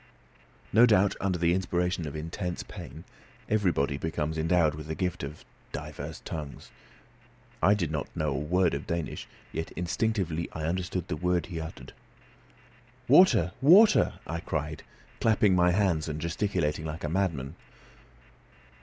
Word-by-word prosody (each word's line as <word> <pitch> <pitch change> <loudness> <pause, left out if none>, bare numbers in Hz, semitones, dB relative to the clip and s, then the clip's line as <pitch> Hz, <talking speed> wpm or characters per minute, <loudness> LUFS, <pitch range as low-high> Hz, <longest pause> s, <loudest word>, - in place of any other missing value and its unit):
No 115 +4 +7
doubt 100 -3 +4
under 95 -2 0
the 85 0 +2
inspiration 90 -2 -1
of 70 - -6
intense 85 +3 -4
pain - - -10 0.4
everybody 85 -10 +1
becomes 80 -1 -2
endowed 80 -1 +2
with 75 0 -8
the 80 - -3
gift 90 -1 -2
of 70 +2 -7 0.3
divers - - -7
tongues. 75 -4 -7 0.9
I 100 +5 +5
did 85 -7 -2
not 75 -2 -2
know 75 -1 0
a 65 - -1
word 90 +4 +1
of 70 - -4
Danish, 85 -1 -3 0.2
yet 80 - -4
instinctively 90 -2 -1
I 80 - -5
understood 90 +1 -2
the - - -2
word 90 0 0
he 85 0 -7
had 80 - -3
uttered. - - -13 1.1
"Water! 120 - +6
water!" 200 +10 +6
I 80 +2 -4
cried, 75 -2 -3 0.4
clapping 105 -3 +3
my 90 0 +4
hands 90 -4 +1
and 75 0 -4
gesticulating 85 -2 -1
like 80 +1 -5
a - - -1
madman. 80 -6 -1
85 Hz, 145 wpm, -28 LUFS, 80-95 Hz, 1.1 s, No